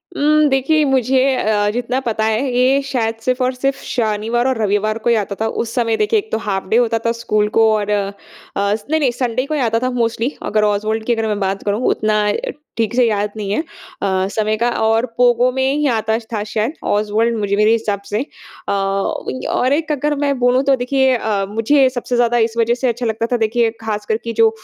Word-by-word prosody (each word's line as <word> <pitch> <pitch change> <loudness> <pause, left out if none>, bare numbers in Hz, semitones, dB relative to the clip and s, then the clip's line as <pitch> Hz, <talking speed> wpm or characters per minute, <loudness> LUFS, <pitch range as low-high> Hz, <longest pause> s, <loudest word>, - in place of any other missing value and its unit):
उम, 305 +1 +3
देखिए 275 +4 +2
मुझे 265 -1 +2 0.2
अ, 210 -3 +1
जितना 245 +2 -1
पता 225 -3 -1
है, 225 +5 0
ये 260 +3 +3
शायद 230 -4 -2
सिर्फ़ 255 +2 -1
और 255 +1 +1
सिर्फ़ 270 +2 -2
शनिवार 225 +1 0
और 260 -2 0
रविवार 210 +1 0
को 225 +1 -1
ही 235 - +4
आता 200 0 -5
था। 220 - +1 0.2
उस 230 0 -7
समय 230 -3 +1
देखिए 425 +1 +2
एक 435 - -10
तो - - +1
हाफ़ 190 -2 -2
डे 225 - +3
होता 230 -2 +2
था 230 - +3
स्कूल 215 -2 0
को 225 -1 +5
और 210 -1 -1
अस 200 +1 -3
नहीं, 315 0 +2
नहीं, 265 -5 +2
संडे 250 +1 -2
को 305 - -4
ही 300 - 0
आता 230 -1 +1
था 255 +1 -1
मोस्टली, 230 +3 -1
अगर 215 0 +1
ऑसवाल्ड 215 +1 0
की 240 - +2
अगर 225 -1 -1
मैं 210 -1 -1
बात 195 0 -2
करूँ। 205 +3 -1
उतना 215 -1 +1
अ, - - +1 0.4
ठीक 225 0 0
से 250 - +4
याद 210 -1 0
नहीं 200 -2 -3
है 210 - 0 0.4
अ, 190 -1 0
समय 215 0 0
का 235 +2 +1
और 225 +2 +2
पोगो 245 0 +4
में 265 +1 0
ही 295 0 +1
आता 220 -2 0 0.2
था 210 -1 -1
शायद 220 +5 -2
ऑस्वल्ड 215 +3 +1
मुझे 200 -1 0
मेरे 210 +2 +3
हिसाब 215 -3 0
से 210 +4 -1 0.5
अ, - - -1
और 195 - -1
एक 315 +1 -1
अगर 295 +1 0
मैं 280 -1 0
बोलूँ 250 +2 +3
तो 275 0 +3
देखिए 265 +1 +1
अ, 210 -4 -1
मुझे 260 +6 +3
सबसे 245 -1 -3
ज़्यादा 240 0 +2
इस 225 - -14
वजह 230 0 +2
से 255 +1 -1
अच्छा 240 +1 -2
लगता 225 0 -1
था, 245 - +2
देखिए, 225 +1 +1
खासकर 215 0 -2
कि 230 -1 -4
जो 225 0 +4
230 Hz, 220 wpm, -18 LUFS, 215-255 Hz, 0.5 s, को